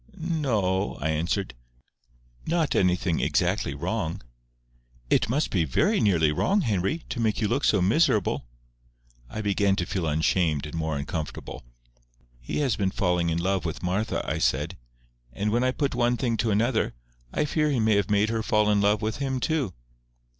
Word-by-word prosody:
"No—o—o," 115 - 0
I 75 - -1
answered. 85 +5 -1 0.9
"Not 165 -2 +1
anything 90 -2 +2
exactly 70 - 0
wrong." 85 - -3 0.9
"It - - +3
must 145 +6 0
be 90 -5 +2
very 70 -6 +2
nearly 85 -7 +3
wrong, 195 - +1
Henry, 110 - -1
to 120 - -4
make 110 -2 +1
you 110 - +1
look 130 +7 0
so 100 -4 +3
miserable." 105 - +2 0.8
I 110 - -4
began 100 -1 +2
to 90 - -1
feel 90 -3 -2
ashamed 80 -1 +1
and 75 - -8
more 80 -2 -2
uncomfortable. 75 0 -5 0.8
"He - - -5
has 130 -7 +1
been 100 -2 0
falling 90 -3 0
in 80 - 0
love 95 +1 0
with 80 +1 -4
Martha," 100 +5 -1
I 75 0 -1
said; 80 +4 0 0.6
"and 105 +11 -1
when 120 +3 +2
I 130 - +3
put 140 +2 -1
one 120 0 +1
thing 120 -3 0
to 115 - 0
another, 110 - +1 0.4
I 150 - 0
fear 150 +1 +1
he 135 -4 +1
may 110 -1 +3
have 100 -1 0
made 105 +1 +2
her 115 0 -1
fall 105 -1 +2
in 100 -1 +3
love 105 +1 +2
with 110 0 -1
him 135 -2 -2
too." 145 - 0
100 Hz, 175 wpm, -26 LUFS, 85-120 Hz, 0.9 s, It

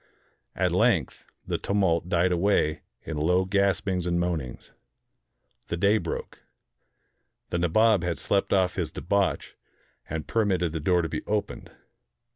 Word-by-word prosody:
At - - +1
length - - +1 0.2
the - - -2
tumult 90 -4 0
died 90 +1 +2
away 85 -4 +1 0.2
in 80 - -5
low 90 +5 +2
gaspings 95 -2 0
and 85 0 +1
moanings. 80 -8 -3 1.0
The 85 - -3
day 100 +5 +3
broke. - - -6 1.1
The 85 - 0
Nabob 100 +3 +3
had 85 -2 -1
slept 100 -1 0
off 95 -2 +2
his - - -2
debauch, 100 +2 -1 0.5
and 80 -1 -4
per 115 - +1
mitted 90 -5 0
the 80 - -3
door 90 +3 +2
to - - -1
be - - -4
opened. 105 -1 -3
90 Hz, 140 wpm, -26 LUFS, 85-100 Hz, 1.1 s, day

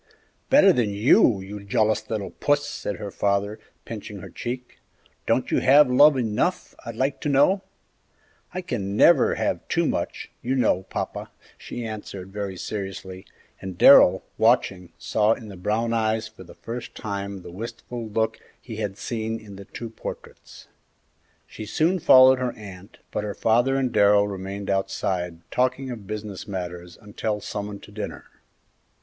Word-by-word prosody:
"Better 265 -9 +7
than 120 -7 +1
you, 100 0 +4
you 100 +1 -8
jealous 110 +1 0
little 105 -3 -3
Puss!" 145 0 0
said 145 -8 -4
her 105 -2 -7
father, 100 +2 -1 0.3
pinching - - -7
her - - -10
cheek; 125 +1 -6 0.5
"don't - - +1
you - - +3
have 140 0 +6
love 145 +2 +6
enough, 110 -4 -1
I'd 115 - -7
like 135 +4 -1
to 150 - -1
know?" 145 +8 +4 0.9
"I 185 - -4
can 105 - -3
never 160 0 +5
have - - -2
too - - +1
much, - - -3
you 130 +2 -1
know, 95 -7 +1
papa," - - -4 0.3
she 120 - -7
answered, 100 -3 -7
very 100 -2 -4
seriously, 95 -2 -6 0.3
and 95 -2 -7
Darrell, 95 -8 +7 0.2
watching, 100 -6 +2
saw 110 0 +2
in 110 -2 -9
the 100 - -9
brown 110 +6 -1
eyes 110 -1 0
for 110 - -14
the - - -14
first 120 +1 -7
time 100 -2 -5
the - - -9
wistful 115 +3 -7
look 110 +1 -1 0.2
he 115 -4 -9
had 100 -3 -3
seen 115 0 -3
in 105 -2 -12
the 100 0 -10
two 115 +3 -8
portraits. - - -10 0.8
She 110 - -9
soon 165 - +1
followed 130 -5 +7
her 125 -1 -1
aunt, 100 -2 -12
but - - -2
her 105 -1 -4
father 120 +4 +2
and 130 -2 0
Darrell 100 -1 +4
remained 100 0 -6
outside 95 -3 -2
talking 130 +1 0
of 110 -5 -8
business 105 -2 -6
matters 90 -2 -6
until 105 0 -3
summoned 105 -1 -6
to - - -13
dinner. 105 +1 -6
110 Hz, 160 wpm, -24 LUFS, 100-120 Hz, 0.9 s, Better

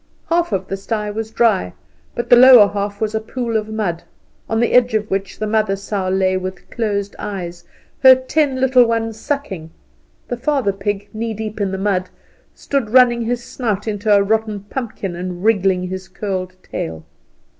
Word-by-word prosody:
Half 340 -3 +2
of 190 -2 -2
the 195 - -3
sty 210 +1 -3
was 220 +1 -4
dry, 220 - +1 0.4
but 240 - -3
the - - +10
lower 245 -4 +9
half 200 0 -3
was 220 -1 -1
a 220 - 0
pool 235 +1 -4
of 215 0 -1
mud, 200 -6 -2 0.5
on 225 - 0
the 235 - +1
edge 245 -2 +4
of 215 0 -1
which 195 -1 -2
the 215 - -2
mother 215 -2 +1
sow 195 -1 -3
lay 185 0 +1
with 185 0 -6
closed 205 -3 -2
eyes, 175 -4 -6 0.3
her 260 -1 +9
ten 260 +1 0
little 260 -1 +5
ones 225 -1 -2
sucking; 220 - -4 0.6
the 245 - -3
father 260 -5 0
pig, 200 +1 -3
knee 220 0 -3
deep 215 0 -5
in 200 - +1
the 190 - -3
mud, 190 -2 -1 0.5
stood 275 -6 -2
running 240 0 +5
his 240 +1 -2
snout 215 -5 -3
into 210 0 -1
a 200 -1 +6
rotten 215 0 0
pumpkin 205 -4 -5
and 180 0 -5
wriggling 195 -4 +2
his 185 +1 -6
curled 185 -2 -4
tail. 80 -1 -5
210 Hz, 180 wpm, -19 LUFS, 195-230 Hz, 0.6 s, the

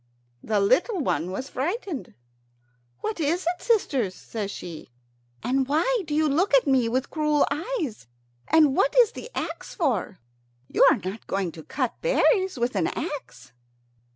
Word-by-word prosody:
The 215 -2 0
little 360 - +2
one 180 - 0
was 255 +9 -5
frightened. 325 - -3 0.9
"What 430 -4 -3
is 330 +4 0
it, 350 +1 -1
sisters?" 275 - +1
says 210 -3 -5
she; 170 -8 -8 0.5
"and 265 +1 +1
why 345 - +2
do 295 - -2
you 310 0 +3
look 300 +3 +3
at 270 - +4
me 260 -5 +3
with 260 +4 -1
cruel 300 -2 +2
eyes? 305 - -3 0.4
And 300 -4 +5
what - - +2
is 480 -4 +6
the 475 - -9
axe - - -5
for? 230 - -1 0.5
You - - +3
are - - +3
not 190 +4 -7
going 195 -3 -1
to 160 - -10
cut 255 - -3
berries 385 - +2
with 240 -1 -1
an 175 -5 +1
axe." 295 -4 -6
280 Hz, 155 wpm, -25 LUFS, 225-345 Hz, 0.9 s, is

